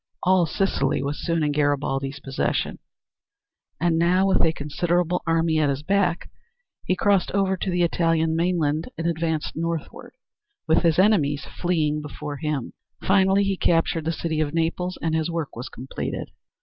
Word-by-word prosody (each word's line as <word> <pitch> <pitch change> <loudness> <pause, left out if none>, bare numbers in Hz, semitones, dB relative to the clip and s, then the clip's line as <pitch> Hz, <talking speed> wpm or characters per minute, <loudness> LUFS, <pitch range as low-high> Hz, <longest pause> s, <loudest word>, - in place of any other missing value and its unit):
All 185 -2 +4
Sicily 155 -7 0
was 145 +1 -4
soon 165 -2 0
in 150 - +1
Garibaldi's 140 -1 0
possession, 135 -1 -2 1.0
and 165 -1 +2
now, 180 +3 +3
with 195 - +3
a 165 - +4
considerable 170 +4 -1
army 165 -1 +2
at 150 -2 +2
his 140 +1 -2
back, 185 -1 0 0.5
he 185 - +1
crossed 200 0 +2
over 195 -1 +2
to 190 - -3
the 175 -1 +1
Italian 165 -1 +1
mainland 165 -2 0
and 165 - -3
advanced 160 -2 -1
northward, 165 -1 -4 0.5
with 160 - +4
his 165 -3 +2
enemies 165 -8 +3
fleeing 155 -4 -1
before 145 0 -6
him. 150 -4 -3 0.3
Finally 195 +1 +4
he 195 0 0
captured 165 -2 +1
the 165 - +1
city 160 -1 -2
of 155 0 -1
Naples 170 +2 -1
and 165 -1 0
his 160 +1 0
work 165 -3 -4
was 120 +2 -6
completed. 130 +2 -5
165 Hz, 160 wpm, -24 LUFS, 150-180 Hz, 1.0 s, All